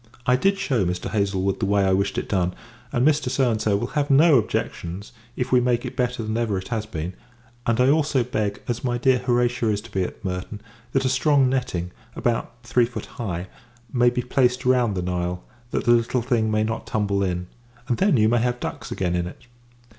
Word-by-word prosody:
I 125 0 +4
did 195 +9 +2
shew 130 - 0
Mr. 90 0 -2
Haslewood 100 -2 0
the 100 - 0
way 100 -1 +3
I 95 - +3
wished 100 +1 0
it - - -2
done; 90 -2 0 0.4
and 125 +3 +2
Mr. 125 -8 +1
will 120 - -1
have 145 0 -1
no 145 0 +6
objections, 95 -2 -4 0.2
if 125 0 -3
we 125 -1 +5
make 120 -1 +1
it - - -6
better 125 -2 -1
than 110 0 -3
ever 115 -4 0
it 95 - -6
has 110 -3 -2
been: 85 -2 -4 0.5
and, 115 0 +2
I 125 - +5
also 145 -3 +2
beg, 110 -4 -2
as 120 +1 -2
my 120 -2 0
dear 130 +1 +3
Horatia 120 -2 +1
is 105 -1 +1
to 115 - -14
be 95 - 0
at 95 - -5
Merton, 95 +3 -4 0.3
that 135 0 +2
a - - +3
strong 135 0 +3
netting, 125 -10 -2 0.2
about 120 -1 -1
three 120 0 +3
feet 120 - -6
high, 90 -7 -5 0.5
may 120 -1 +5
be 125 0 -2
placed 125 0 +1
round 125 -5 +3
the 90 - -1
Nile, 90 0 -2 0.3
that - - -1
the 120 - +5
little 120 +1 +2
thing 115 -3 +1
may 110 0 +2
not 110 +1 -3
tumble 100 -3 0
in; 90 -2 -1 0.4
and, 120 - 0
then, 195 -8 +4
you 110 -1 +4
may 120 +2 +3
have 120 +1 0
ducks - - -5
again 90 -2 -1
in 85 0 -1
it. 90 - -11
115 Hz, 215 wpm, -23 LUFS, 100-125 Hz, 0.5 s, no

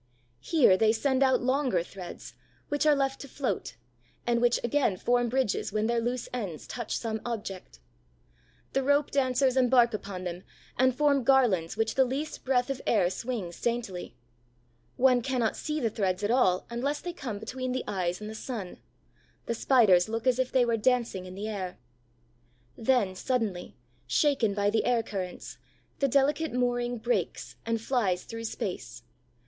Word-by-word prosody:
Here 240 - +4
they 220 +2 +4
send 265 +3 +1
out 260 -2 +3
longer 255 -8 +1
threads, 180 -1 -9 0.4
which 290 +1 +1
are 300 - +6
left 270 -1 -1
to 280 - -8
float, 275 +1 -3 0.5
and 235 -1 +1
which 240 0 +3
again 240 -5 +1
form 245 +3 +1
bridges 255 -5 0
when 215 +1 0
their 235 +1 +1
loose 240 +1 -2
ends 195 -11 -4
touch 235 -3 -4
some 220 -2 -3
object. 200 - -6 0.9
The 270 - +2
rope 285 +2 +2
dancers 260 -1 +2
embark 245 -2 +4
upon 200 -3 -5
them 175 0 -5 0.3
and 255 0 +3
form 285 -1 +3
garlands 230 -10 +3
which 225 0 0
the 265 - +4
least 275 +5 -4
breath 255 0 +1
of 270 - -4
air 185 -5 +3
swings 215 -7 -5
daintily. 225 - -3 0.8
One 250 -1 +4
cannot 245 -3 0
see 305 0 -3
the 230 -5 0
threads 190 -2 -1
at 205 - +1
all 190 -8 +3
unless 280 +5 -1
they 350 0 -5
come 245 - -5
between 255 +4 -4
the 255 - -2
eyes 180 -3 -1
and 210 - -7
the 215 - -6
sun; 220 -5 -6 0.7
the - - -1
Spiders 220 -7 +4
look 225 +2 -3
as 255 -1 +3
if 260 -1 0
they 255 -2 +4
were 230 -1 +1
dancing 235 -5 +1
in 185 - -9
the 205 +2 -4
air. 190 -4 -4 1.0
Then, 225 -5 +2
suddenly, 210 -3 -2 0.3
shaken 260 -9 +2
by 205 0 +2
the 220 - +1
air 240 -2 +2
currents, 185 -4 -6 0.4
the 275 - +3
delicate 285 +3 +2
mooring 245 -1 0
breaks 235 +2 -2
and 230 0 0
flies 215 -7 0
through 230 0 -7
space. - - -5
235 Hz, 165 wpm, -28 LUFS, 205-260 Hz, 1.0 s, are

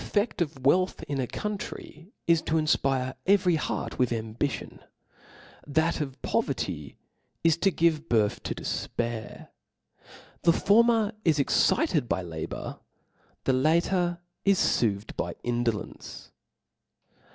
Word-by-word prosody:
3<^7 - - -9
The 205 - +5
tScSt 210 -3 -2
of 160 -2 0
wcilth 185 +7 +2
in 140 -1 -3
a 125 - -1
country 205 - -6
is 165 -1 +4
to 160 - -1
infpire 135 -4 +2
Book 130 - -11
every 185 -2 +4
heart - - -3
with 125 -2 +2
ambition 115 +3 -3
i - - -22 0.8
that 160 +3 +1
of 135 -2 -5
poverty 70 -3 -2 0.5
is 165 -2 +5
to 195 - +3
c^p^u - - -8
give 165 -1 +2
birth 110 -3 +2
to - - -4
defpair. 115 -2 -4 0.9
The 170 - +5
former 225 +2 +4
is 160 -3 +3
excited 140 - +2
by 85 +2 0
la 85 -2 -8
and 80 - -3
4, - - -5
bour, - - -7 0.6
the 135 - +2
latter 170 +5 +2 0.3
is 195 -2 +3 0.2
foothed 105 -2 -1
by - - -3
indolence. 120 -3 -3
150 Hz, 145 wpm, -27 LUFS, 120-175 Hz, 0.9 s, The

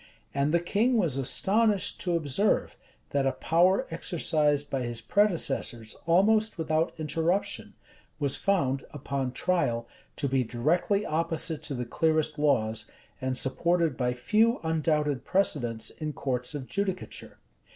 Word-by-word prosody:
And 140 +2 +1
the 170 - +3
king 220 +8 +1
was 170 - +1
astonished 200 - +1
to 175 -2 0
observe, 165 +6 0 0.4
that 140 -1 +1
a 135 - +1
power 175 +8 +3
exercised 150 -3 0
by 135 - -1
his 120 -1 -4
predecessors 140 - 0
almost 215 +6 +3
without 160 0 0
interruption, 165 +5 -1 0.4
was 140 -3 0
found, 140 -9 0
upon 135 -2 -3
trial, 120 -6 0 0.3
to 140 - -1
be 135 -1 +1
directly 170 - 0
opposite 160 -1 -1
to 140 - -4
the 125 -1 -3
clearest 155 +3 +1
laws, 110 -7 +1 0.3
and 130 0 -1
supported 165 +3 +1
by 125 -1 -1
few 225 - +2
undoubted 150 -4 0
precedents 130 - 0
in 155 -1 -5
courts 125 +1 -2
of 140 -3 -5
judicature. 190 +3 -4
155 Hz, 130 wpm, -28 LUFS, 135-180 Hz, 0.4 s, the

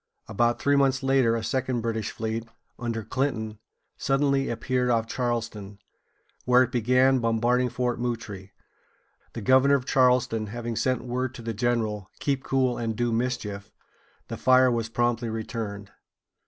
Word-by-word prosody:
About 120 +3 +1
three 140 0 +2
months 135 -1 +2
later 135 -4 +3
a 115 - -3
second 130 -1 -1
British 110 -2 -2
fleet, 110 +1 -4 0.3
under 115 -2 -3
Clinton, 110 -5 -2 0.4
suddenly 135 0 +1
appeared 125 +2 -1
off 115 -2 +2
Charleston, 115 -5 -3 0.7
where 125 0 +5
it 125 - -4
began 125 +2 +3
bombarding 120 +2 +1
Fort 125 0 -2
Moultrie 115 -5 -4
(moo´trī). - - -40
The 115 - -6
governor 130 +5 +5
of 130 -2 -2
Charleston 125 -4 +2
having 120 +1 -5
sent 130 +1 0
word 125 +1 -3
to 115 - -9
the 115 0 -3
general, 110 -3 -1
"Keep 135 -2 -1
cool 130 -2 0
and 115 -2 -2
do 120 +1 0
mischief," 110 -4 -3 0.6
the - - -5
fire 130 0 +5
was 115 -1 -1
promptly 120 0 0
returned. 110 -2 -5
120 Hz, 150 wpm, -26 LUFS, 115-130 Hz, 0.7 s, where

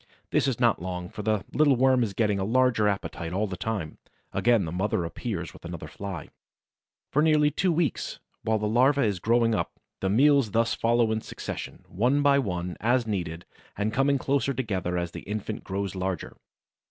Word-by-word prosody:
This - - +2
is 130 -4 -1
not 120 -6 +3
long, 90 -1 -4
for 110 0 -7
the 110 -1 0
little 145 -2 +4
worm 130 0 +4
is 105 -5 -1
getting 105 -3 +1
a - - 0
larger 115 0 +3
appetite 90 -4 -3
all 100 +3 +1
the 95 -3 -4
time. 95 -5 -4 0.3
Again 115 -5 +3
the 80 - -4
mother 90 -1 0
appears 90 +1 -4
with - - -15
another 85 -3 -6
Fly. 95 -3 -7 0.8
For 150 - +3
nearly 150 -1 +4
two 180 +5 +1
weeks, 160 -5 -1 0.2
while 110 0 +1
the 105 0 -1
larva 130 +6 +4
is 100 -5 0
growing 115 +2 +3
up, - - -1 0.3
the 95 - 0
meals 140 +2 +4
thus 115 +3 +1
follow 115 -1 +2
in 110 0 0
succession, - - -7
one 125 +10 +1
by 140 -1 +5
one, 90 -7 -3
as 120 +2 +2
needed, 90 -6 -3 0.3
and 105 +2 -1
coming 140 +1 +3
closer 140 0 0
together 95 -8 -2
as 85 -1 -2
the - - -7
infant 105 +1 -5
grows 100 0 -3
larger. 95 -2 -3
110 Hz, 190 wpm, -27 LUFS, 95-130 Hz, 0.8 s, by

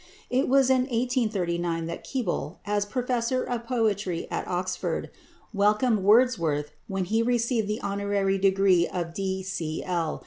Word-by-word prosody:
It 255 +2 +2
was 265 0 +4
in 255 -1 +3
1839 195 -9 0
that 170 +1 -6
Keble, 220 - -3
as 205 0 0
Professor 250 +2 -1
of 235 -1 -4
Poetry 210 -8 0
at - - -3
Oxford, 180 0 -2 0.4
welcomed 210 +3 +3
Wordsworth 190 - +3 0.2
when 195 -1 -2
he 220 +5 +1
received 235 -2 +1
the 210 +1 -2
honorary 200 -1 0
degree 190 -2 +4
of 170 -2 -4
D.C.L. 180 -3 -2
200 Hz, 130 wpm, -26 LUFS, 180-235 Hz, 0.4 s, was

